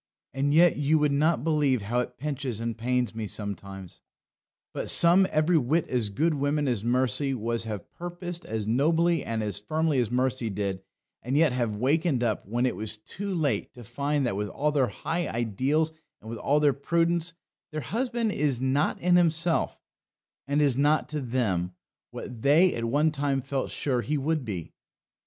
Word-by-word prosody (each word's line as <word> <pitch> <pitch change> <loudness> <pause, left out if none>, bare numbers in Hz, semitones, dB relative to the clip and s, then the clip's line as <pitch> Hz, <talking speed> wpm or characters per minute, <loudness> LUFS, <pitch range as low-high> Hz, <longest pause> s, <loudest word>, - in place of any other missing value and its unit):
And 140 +1 0
yet 170 +3 +5
you 145 +2 +2
would 150 -1 +2
not 145 -2 +2
believe 145 -7 +1
how 120 +5 0
it 125 0 -4
pinches 135 -4 -3
and 115 -1 -3
pains 125 +1 -1
me 110 -1 -4
sometimes." 100 -3 -5 0.7
But - - -2
some 180 +3 +6
every 155 +2 +3
whit 150 +6 0
as 120 -5 0
good 155 +11 +1
women 145 +1 0
as 120 -5 -1
Mercy 130 +3 +1
was 115 0 -2
have 105 -5 -5
purposed 175 0 -6
as 110 -1 -3
nobly 160 +7 +2
and 115 -1 -2
as 105 -1 -2
firmly 155 -3 0
as 120 - 0
Mercy 125 -1 0
did, 100 -1 -3 0.4
and 130 +4 -1
yet 155 -2 +4
have 120 -4 -1
wakened 140 - +1
up, 110 -5 -1
when 120 +4 0
it 125 - 0
was 110 0 -3
too 195 - -6
late, 140 -11 -1
to 120 - -10
find 140 +5 -1
that, 120 - -1
with 105 +1 -2
all 150 +9 0
their 140 -4 +2
high 170 - -3
ideals, 130 +8 0 0.3
and 110 - -10
with 115 - -6
all 145 +7 +2
their 145 -2 +4
prudence, 170 +3 0 0.4
their 155 0 -3
husband 230 - -1
is 140 -8 0
not 130 +3 +1
in 180 0 +4
himself, 165 -1 +1 0.7
and 145 +2 +2
is 140 -4 +3
not 145 +3 +2
to 150 -1 -3
them, 100 -9 -1 0.3
what 120 -3 -8
they 160 +8 +5
at 115 - -3
one 150 +6 +2
time 140 -2 0
felt 135 0 -3
sure 130 -4 -1
he 150 +4 -1
would 155 +1 -1
be. 95 -8 -6
135 Hz, 185 wpm, -27 LUFS, 115-155 Hz, 0.7 s, some